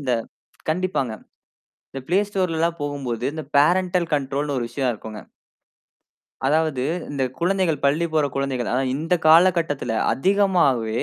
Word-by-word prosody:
அந்த 130 -3 -1 0.6
கண்டிப்பாங்க. 170 -8 -1 0.8
இந்த 135 - -6
Play 185 +4 +3
Storeலலாம் 170 -4 -1
போகும்போது, 135 -5 -4
இந்த 155 -1 -5
பேரன்டல் 175 +3 +3
கண்ட்ரோல்ன்னு 140 0 -2
ஒரு 120 - -1
விஷயம் 125 +1 -1
இருக்கும்ங்க. 110 0 -9 1.3
அதாவது, 155 -2 +1 0.3
இந்த 140 -2 -2 0.2
குழந்தைகள் 175 -4 0
பள்ளி 150 +5 +2
போற 155 -2 +2
குழந்தைகள் 135 -3 -2
அதாவது 130 +1 0
இந்த 165 +3 0
காலகட்டத்தில 165 -6 +4 0.2
அதிகமாவே, 165 - +2
150 Hz, 120 wpm, -22 LUFS, 135-175 Hz, 1.3 s, காலகட்டத்தில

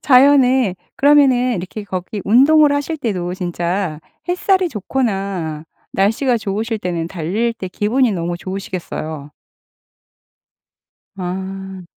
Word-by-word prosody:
자연에 260 -5 +5 0.2
그러면은 265 -5 +4
이렇게 185 +4 -6
거기 185 +2 -5
운동을 285 +6 +5
하실 290 +3 -1
때도 185 -9 -2
진짜 175 -2 -2 0.3
햇살이 370 0 +2
좋거나 195 - -2 0.3
날씨가 230 +6 +2
좋으실 220 +2 -2
때는 170 -3 -3
달릴 195 +8 -1
때 190 -5 -7
기분이 225 +5 +1
너무 175 -1 -2
좋으시겠어요. 175 -6 -5 1.9
아. 190 +1 -5
200 Hz, 250 characters per minute, -18 LUFS, 180-255 Hz, 1.9 s, 자연에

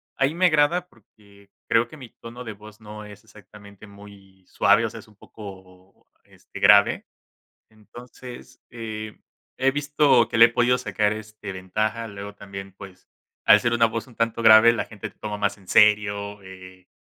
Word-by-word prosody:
ahí 135 +2 0
me 185 +1 +3
agrada 170 +3 +1
porque 100 - -24 0.2
creo 115 +1 +2
que 155 - -14
mi 130 -5 -12
tono 120 +2 -11
de 110 -3 -7
voz 105 +1 -16
no 105 0 -10
es 105 -1 -14
exactamente 100 0 -16
muy 100 -2 -17
suave, 105 +3 +2
o - - -3
sea, 115 - -10
es 110 - -16
un 110 - -22
poco, 95 -2 -15 0.2
este, - - -14
grave. 100 0 +4 0.7
Entonces, 120 +3 -14
eh, 110 -2 -8 0.4
he 135 +1 +2
visto 145 -4 +2
que - - -3
le 115 - +9
he - - -3
podido 120 +1 +1
sacar, 105 -1 -1
este, 110 -1 -8
ventaja, 110 +5 -3
luego 100 0 -9
también, 100 -1 -10
pues, 95 -1 -14 0.4
al - - +7
ser 120 - -1
una 120 -1 +3
voz 115 +2 -5
un 120 - -19
tanto 115 0 -2
grave, 110 +1 +7
la 115 - -3
gente 110 -1 -9
te - - -33
toma 105 -1 -6
más 100 0 -2
en 95 -2 -22
serio, 105 -1 +2
eh, 95 -1 -14
105 Hz, 180 wpm, -23 LUFS, 100-115 Hz, 0.7 s, le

